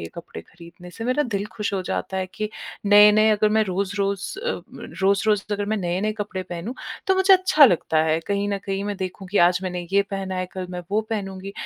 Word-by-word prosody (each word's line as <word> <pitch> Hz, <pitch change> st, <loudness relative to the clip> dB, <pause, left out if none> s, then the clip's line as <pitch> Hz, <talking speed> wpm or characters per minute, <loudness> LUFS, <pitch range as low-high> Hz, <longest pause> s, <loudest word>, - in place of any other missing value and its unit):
ये 85 Hz, -, -5 dB
कपड़े 170 Hz, -, -9 dB
खरीदने 175 Hz, +1 st, -14 dB
से। 225 Hz, +5 st, -8 dB
मेरा 255 Hz, +4 st, +1 dB
दिल 205 Hz, -7 st, -2 dB
खुश 210 Hz, -2 st, -2 dB
हो 190 Hz, -, -1 dB
जाता 190 Hz, +1 st, -3 dB
है 190 Hz, 0 st, -1 dB
कि 215 Hz, -1 st, -3 dB, 0.4 s
नए-नए 210 Hz, +1 st, +7 dB
अगर 215 Hz, 0 st, +3 dB
मैं 220 Hz, -, +3 dB
रोज़-रोज़ 200 Hz, -, -2 dB
अ, 485 Hz, 0 st, -3 dB, 0.4 s
रोज़-रोज़ 200 Hz, +1 st, +2 dB
अगर 205 Hz, 0 st, -1 dB
मैं 215 Hz, +1 st, 0 dB
नए-नए 190 Hz, +3 st, -1 dB
कपड़े 205 Hz, -2 st, -4 dB
पहनूँ, 180 Hz, +7 st, -6 dB, 0.3 s
तो 380 Hz, -, +3 dB
मुझे 380 Hz, +1 st, +5 dB
अच्छा 370 Hz, -5 st, +5 dB
लगता 165 Hz, -, +3 dB
है। 160 Hz, 0 st, +1 dB
कहीं 200 Hz, 0 st, -1 dB
न 200 Hz, -, -1 dB
कहीं 195 Hz, 0 st, -4 dB
मैं 205 Hz, 0 st, -3 dB
देखूँ 190 Hz, +1 st, -6 dB
कि 205 Hz, -, 0 dB
आज 175 Hz, +1 st, +4 dB
मैंने 180 Hz, -1 st, -3 dB
ये 200 Hz, -, +5 dB
पहना 195 Hz, -1 st, -4 dB
है, 185 Hz, -, -2 dB
कल 185 Hz, 0 st, -7 dB
मैं 180 Hz, -1 st, -5 dB
वो 210 Hz, +2 st, +2 dB
पहनूँगी 195 Hz, -2 st, -4 dB
200 Hz, 215 wpm, -23 LUFS, 185-215 Hz, 0.4 s, नए-नए